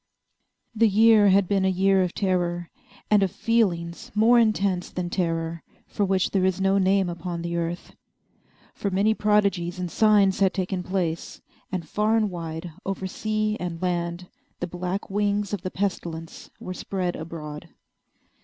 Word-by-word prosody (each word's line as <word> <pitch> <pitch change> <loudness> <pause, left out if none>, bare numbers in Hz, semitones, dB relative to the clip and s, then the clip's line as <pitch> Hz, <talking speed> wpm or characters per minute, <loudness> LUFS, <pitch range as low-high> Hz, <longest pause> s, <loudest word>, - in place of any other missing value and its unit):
The 225 0 +4
year 215 0 +6
had 195 -1 +4
been 195 0 +1
a 190 - +3
year 190 +1 +3
of 180 -1 -1
terror, 175 -3 -1 0.4
and 210 -1 +5
of 195 - +2
feelings 175 -7 -1
more 230 +3 +5
intense 200 -5 +1
than 175 -1 -4
terror 165 -2 -1 0.2
for 205 - -2
which 190 -1 +1
there 190 -2 +1
is 190 0 +1
no 195 +1 +3
name 190 0 +3
upon 170 0 -5
the 170 0 -3
earth. 170 +1 -4 0.8
For 200 - -3
many 200 +3 +2
prodigies 200 -5 +1
and 180 -2 -4
signs 205 -3 +4
had 195 -2 +3
taken 185 -1 -2
place, 180 -3 -3 0.3
and 175 -4 -3
far 215 +6 +1
and 215 -3 +1
wide, 165 0 -6
over 195 -1 -3
sea 215 +2 -1
and 175 -2 -4
land, 175 0 -2 0.3
the - - -2
black 180 +3 -4
wings 205 0 0
of 200 - -2
the 185 - -3
Pestilence 170 -4 -4
were 185 - -6
spread 185 -1 -3
abroad. 155 0 -7
185 Hz, 160 wpm, -25 LUFS, 175-200 Hz, 0.8 s, year